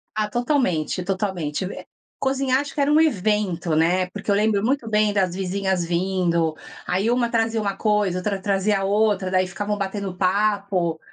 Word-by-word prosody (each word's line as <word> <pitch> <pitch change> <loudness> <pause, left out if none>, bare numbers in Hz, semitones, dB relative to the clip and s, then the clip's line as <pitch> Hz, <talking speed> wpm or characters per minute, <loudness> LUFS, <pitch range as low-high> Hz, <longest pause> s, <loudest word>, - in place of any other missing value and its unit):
Ah 215 -1 0
totalmente, 240 - 0
totalmente. 185 -4 -2 0.5
Cozinhar 265 -1 +1
acho 285 0 -6
que - - -2
era 280 +1 +2
um 310 - +5
evento, 195 - +1
né, 180 +3 +2
porque 205 +2 -9
eu 200 - +4
lembro 210 0 +2
muito 255 -2 0
bem 210 -1 +3
das 185 -3 +1
vizinhas 190 -1 -1
vindo, 170 -2 0 0.3
aí 195 +5 0
uma 240 -1 +1
trazia 225 -1 +1
uma 200 -2 -2
coisa, 210 -4 +1
outra 195 +1 -2
trazia 200 0 +1
outra, 205 -2 +1
daí 185 0 +2
ficavam 205 +3 -3
batendo 195 -1 -3
papo, 195 -3 +1
200 Hz, 160 wpm, -23 LUFS, 185-215 Hz, 0.5 s, um